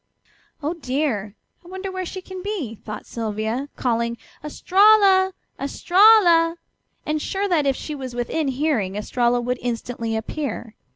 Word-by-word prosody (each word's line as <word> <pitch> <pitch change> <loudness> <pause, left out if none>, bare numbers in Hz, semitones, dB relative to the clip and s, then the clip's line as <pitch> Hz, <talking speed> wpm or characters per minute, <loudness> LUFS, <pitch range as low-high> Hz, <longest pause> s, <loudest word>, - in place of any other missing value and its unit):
"Oh, 305 +4 -1
dear! 255 - -2 0.3
I - - -16
wonder 380 +1 -6
where 370 -1 -4
she 375 +1 -7
can 375 0 -8
be," 370 - -4
thought 210 -1 -8
Sylvia, 225 +4 -3
calling 235 -1 -1 0.3
"Estralla! 380 +4 +4 0.3
Estralla!" 345 +1 +5 0.5
and 305 0 -1
sure 390 +5 -2
that 320 -7 +2
if 270 - +2
she 305 - -6
was 260 -4 -6
within 275 +5 -1
hearing 260 -8 0
Estralla 240 +3 +1
would 250 +1 -2
instantly 230 -1 -3
appear. 235 0 -4
285 Hz, 135 wpm, -22 LUFS, 235-365 Hz, 0.5 s, Estralla